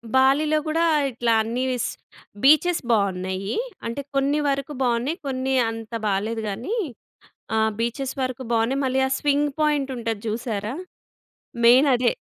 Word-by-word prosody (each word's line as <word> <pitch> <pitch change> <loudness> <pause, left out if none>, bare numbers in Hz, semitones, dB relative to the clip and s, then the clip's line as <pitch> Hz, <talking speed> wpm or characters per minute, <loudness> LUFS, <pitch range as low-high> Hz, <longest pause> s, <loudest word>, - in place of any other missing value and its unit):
బాలీలో 280 +4 +4
గూడా 325 +2 +1 0.3
ఇట్లా 240 -1 0
అన్ని 235 +3 -2
వీస్ 250 -2 -1 0.5
బీచె‌స్ 310 +5 +5
బావున్నాయి. 190 -2 0 0.3
అంటే, 235 +4 -3
కొన్ని 280 +2 +2
వరకు 275 +1 -2
బావున్నాయి. 245 +6 0
కొన్ని 265 0 -1
అంత 225 0 -7 0.2
బాలేదు 210 +3 -1
గానీ, 235 - -3 0.8
ఆహ్, 220 0 +3
బీచెస్ 260 +3 -2
వరకు 255 0 -3
బావున్నాయి. 235 +5 +1
మళ్ళీ 265 0 +1
ఆ - - -9
స్వింగ్ 290 0 +1
పాయింట్ 295 -3 +1
ఉంటది 225 -3 -3
జూసారా? 220 0 -3 0.9
మెయిన్ 255 +5 +7
అదే. 245 -1 +2
255 Hz, 130 wpm, -23 LUFS, 225-275 Hz, 0.9 s, మెయిన్